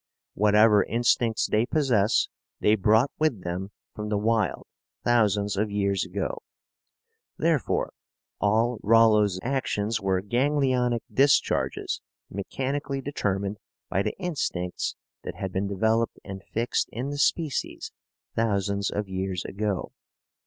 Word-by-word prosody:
Whatever 105 0 +5
instincts 115 -1 +1
they 110 +1 +2
possess 120 -9 +2 0.3
they 105 - +4
brought 110 +5 +3
with 145 -12 +1
them 90 +3 -4 0.2
from 105 0 -5
the 105 - +1
wild 110 -1 0 0.4
thousands 105 -4 +2
of 105 +1 +1
years 100 -1 0
ago. 95 +2 -3 1.0
Therefore, 160 -4 0 0.5
all 110 +3 +2
Rollo's 105 -3 +4
actions 115 -5 -1
were 95 -1 +1
ganglionic 125 0 +1
discharges 140 0 +2 0.3
mechanically 135 +8 -3
determined 100 -7 -2 0.3
by 95 - +1
the - - -3
instincts 140 - -2 0.3
that - - -6
had 95 - -4
been 100 +1 -1
developed 110 +4 0
and 95 -1 -8
fixed 115 +2 0
in 130 +4 -4
the 145 - -4
species 155 -1 0 0.4
thousands 100 -3 0
of 105 -1 -3
years 95 -1 -3
ago. 100 -2 -2
105 Hz, 115 wpm, -26 LUFS, 100-120 Hz, 1.0 s, Whatever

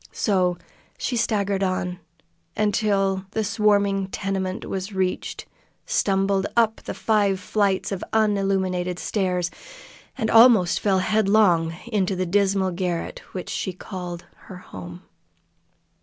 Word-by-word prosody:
So 185 -4 +1 0.4
she 250 - -2
staggered 200 -4 0
on 185 -1 -1 0.6
until 195 -2 +1
the 220 - 0
swarming 200 -2 +2
tenement 190 -1 -3
was 190 +2 -4
reached, 185 -1 -2 0.4
stumbled 195 0 +1
up 225 -1 +3
the - - -6
five 205 -3 +1
flights 200 0 0
of 195 - -3
unillumined 195 -4 +1
stairs, 180 -3 -1 0.7
and 220 - -1
almost 225 -6 +6
fell 195 -2 +2
headlong 200 -6 +3
into 205 -5 0
the 185 0 -1
dismal 195 0 +1
garret 175 -1 -3
which 185 - -5
she 190 - -3
called 180 -2 -7 0.2
her 185 - -9
home. 90 - -10
195 Hz, 115 wpm, -23 LUFS, 185-205 Hz, 0.7 s, almost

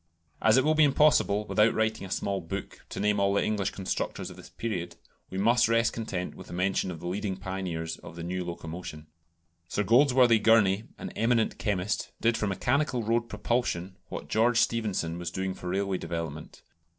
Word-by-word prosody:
As 110 +2 +5
it 130 - +5
will 155 - +4
be 155 0 +5
impossible, 140 -8 +4
without 110 +1 +3
writing 110 -2 0
a - - -13
small 100 0 -1
book, 95 +4 -6
to - - -6
name 105 0 +2
all 100 0 +2
the - - +2
English 105 -3 0
constructors 95 -1 -3
of - - -11
this - - -13
period, 90 -7 -4 0.3
we 95 - -6
must 115 +5 +4
rest 115 -1 +2
content 95 -6 -4
with - - -12
the - - -9
mention 95 +1 0
of 85 -3 -6
the 85 - -9
leading 95 +1 -2
pioneers 95 -4 -4
of - - -12
the 85 - -6
new 90 +1 -3
locomotion. 85 -2 -7 0.6
Sir 105 - -1
Goldsworthy 125 0 +5
Gurney, 110 -2 +4
an - - -6
eminent 115 0 +1
chemist, 100 -2 -1
did 115 0 +2
for 105 - -1
mechanical 125 +5 0
road 115 +2 0
propulsion 105 -5 -1
what - - -6
George 115 +2 +2
Stephenson 105 -8 0
was 85 -1 -3
doing 95 +2 -3
for 90 - -7
railway 95 0 -1
development. 85 -1 -6
100 Hz, 185 wpm, -28 LUFS, 90-115 Hz, 0.6 s, As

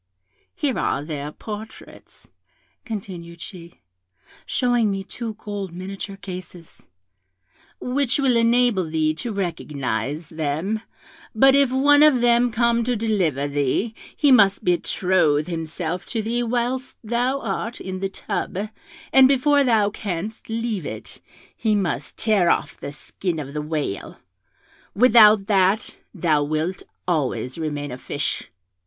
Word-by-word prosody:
Here 285 -4 -1
are 140 - 0
their 150 -1 -5
portraits,' 215 +5 -10 0.5
continued 180 -6 -7
she, 170 -1 -11 0.7
showing 245 -4 +2
me 195 -1 -2
two 220 +3 -6
gold 205 -3 -6
miniature 195 +2 -6
cases, 180 -3 -10 0.9
'which 255 0 0
will 270 -4 +3
enable 230 -6 +3
thee 155 -1 +1
to 225 +9 -4
recognise 150 - -3
them: 160 +7 -2 0.5
but 270 +4 +6
if 280 -2 +4
one 285 +3 +5
of 300 -4 +6
them 240 0 +4
come 235 +1 +2
to 245 +1 0
deliver 185 - 0
thee, 145 - 0 0.2
he 290 -2 +4
must 200 -5 +5
betroth 175 -4 +2
himself 165 +1 -4
to 225 -2 -2
thee 235 +3 -1
whilst 245 +2 -2
thou 245 +4 0
art 225 +1 -3
in 185 0 -5
the 195 0 -2
tub, 195 +1 -4 0.4
and 265 -1 +8
before 280 +2 +4
thou 220 -5 +3
canst 205 +2 -5
leave 225 -4 -2
it, - - -6 0.3
he 215 -2 +1
must 195 -4 -2
tear 205 -6 +3
off - - +1
the 140 - -6
skin 170 +4 -4
of 140 -2 -6
the 150 - -2
whale; 150 -9 -4 0.8
without 215 -3 +7
that, 195 0 +2 0.2
thou 160 -6 +1
wilt 155 +5 -2 0.3
always 135 -5 -1
remain 145 -3 -3
a 125 - -7
fish. - - -3
195 Hz, 130 wpm, -23 LUFS, 165-235 Hz, 0.9 s, and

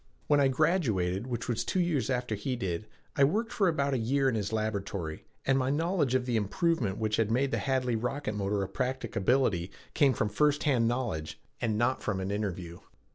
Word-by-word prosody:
When 145 -1 +4
I 140 - +5
graduated, 125 - +1
which 120 -2 -3
was 120 -3 0
two 185 - -1
years 155 -10 +1
after 125 -3 -1
he 110 +5 -2
did, 95 -3 -3 0.3
I 140 - +4
worked 215 +11 +1
for 195 - +2
about 140 -4 +1
a 130 - +1
year 135 +4 +1
in 130 - +2
his 105 -2 -2
laboratory, 100 -7 -3 0.2
and 135 0 +3
my 130 0 0
knowledge 155 -2 +1
of 130 -1 +1
the 120 -2 +1
improvement 110 - 0
which 110 -1 0
had 110 -2 +1
made 130 +4 +1
the - - 0
Hadley 130 -3 0
rocket 125 +1 -2
motor 100 0 -1
a - - -3
practicability 120 -6 0 0.2
came 140 -4 +4
from 105 -2 0
first 150 +6 +2
hand 125 -6 +3
knowledge 115 -11 -2 0.2
and 110 -3 0
not 120 +3 +1
from 100 -3 -1
an 95 +1 -2
interview. 90 -5 -3
120 Hz, 200 wpm, -30 LUFS, 105-135 Hz, 0.3 s, I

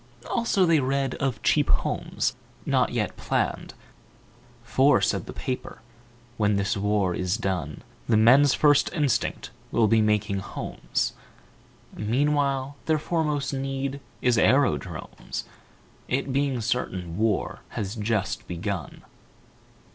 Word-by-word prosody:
Also, 230 -5 +2
they 165 -2 +4
read 135 0 0
of 135 -5 0
Cheap - - +3
Homes, - - 0 0.3
not - - +2
yet - - -1
planned; - - -2 0.9
For, 135 +4 +4
said - - 0
the - - -6
paper, 125 - -5 0.6
"When 105 -1 +2
this 100 0 0
war 100 -2 +1
is 90 +3 -1
done 90 -8 -3 0.3
The 110 - +5
men's 130 +6 +6
first 145 -2 +4
instinct 145 - 0 0.2
will 115 -2 +3
be 115 +1 +4
making 105 -2 +1
homes. - - -3 0.8
Meanwhile 140 +3 0
their 160 -1 +3
foremost 150 -3 -1
need 135 0 -3 0.2
is 120 -2 +3
aerodromes, 120 - 0 0.6
It 135 +1 -1
being 135 -3 0
certain 95 -7 -2
war 110 -3 0
has 100 -2 -4
just 105 -3 -2
begun. 90 +2 -4
120 Hz, 115 wpm, -26 LUFS, 105-140 Hz, 0.9 s, men's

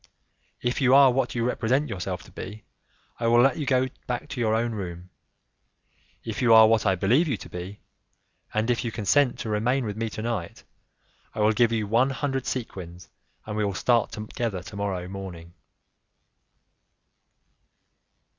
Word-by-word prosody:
If 120 +3 -1
you 130 0 +5
are 140 -2 +7
what 125 0 -1
you 115 -1 0
represent 125 +4 +1
yourself 90 - -4
to - - -16
be, 105 +3 -8 0.5
I 115 - 0
will 120 +1 +5
let 130 +1 +4
you 150 -4 -3
go 130 -1 +3 0.2
back 125 -1 -3
to 140 - -5
your 110 -1 +2
own 115 +1 0
room; 90 -4 -6 1.1
if 110 0 -4
you 115 -3 +6
are 110 0 +9
what 110 -1 +2
I 95 - +3
believe 120 - +2
you 130 -7 -1
to - - -10
be, 90 +3 -8 0.7
and 110 +3 0
if 120 - -1
you 115 - -3
consent 120 +5 +2
to 110 - -5
remain 120 +5 +1
with 105 -2 -4
me 115 +1 -2
to 110 - -6
night, 115 -7 -4 0.7
I - - -2
will 105 +1 +4
give 115 +1 +3
you 110 -2 0
one 115 +6 +2
hundred 135 -1 -2
sequins, 90 -8 -6 0.4
and 105 - -5
we 105 - 0
will 100 -2 -1
start 120 +1 +2
together 110 -3 -4
tomorrow 100 -3 -4
morning." 90 -3 -8
115 Hz, 170 wpm, -26 LUFS, 100-125 Hz, 1.1 s, are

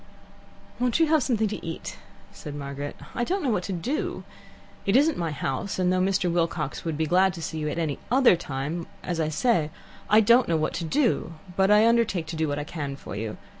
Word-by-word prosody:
"Won't 250 +3 +1
you 325 - +6
have 315 -1 +4
something 225 -4 +1
to 210 - -6
eat?" 165 -1 -6 0.3
said 145 -1 -8
Margaret. 140 0 -5 0.2
"I 240 - -1
don't 380 +9 -1
know 265 - +1
what 195 - +1
to - - -4
do. 235 - -2 0.6
It 195 - +1
isn't 295 +4 +4
my 170 -2 -2
house, 145 +4 -3
and 185 -1 +2
though 185 - +2
Mr. 190 -1 +1
Wilcox 165 -4 -1
would 165 - -2
have - - -5
been 160 0 0
glad 185 +2 +3
to 170 - -7
see 160 +1 -4
you 150 0 -1
at 150 - -4
any 155 -4 -1
other 255 -5 +6
time 155 +2 -4 0.2
as 175 -2 -2
I 155 -1 +1
say, 160 -1 +1 0.4
I 215 - +7
don't 235 +3 +5
know 165 - +2
what 155 0 -1
to - - -3
do, 240 - +1 0.2
but 190 0 +3
I 210 +2 +6
undertake 230 -7 +2
to - - -4
do 160 0 0
what 145 0 -2
I 145 - -2
can 145 -3 -5
for 135 - -8
you. 110 +1 -4
175 Hz, 230 wpm, -26 LUFS, 155-225 Hz, 0.6 s, I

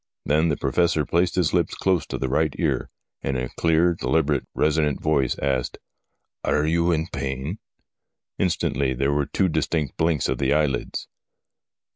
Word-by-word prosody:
Then 80 +3 +2
the 75 - 0
Professor 80 +1 +1
placed 85 +5 +1
his 90 -4 +1
lips - - +1
close 95 -3 +1
to - - -4
the 65 - -2
right 75 +2 +1
ear, - - 0 0.3
and 65 -1 -1
in 65 - -2
a - - -8
clear, 85 +1 +2
deliberate, 75 0 0
resonant 75 -1 +1
voice 70 -5 +1
asked: 65 -2 -1 0.4
' - - -55
Are 75 0 +1
you 85 +2 +2
in 80 -1 +1
pain? 70 +8 -3 0.4
' - - -62
Instantly 65 -1 0
there 70 +3 +1
were 70 -1 0
two 95 - +1
distinct 80 -3 -1
blinks 80 -3 +1
of - - -1
the 70 +1 +2
eyelids. 75 -5 -1
75 Hz, 170 wpm, -24 LUFS, 70-80 Hz, 0.4 s, Then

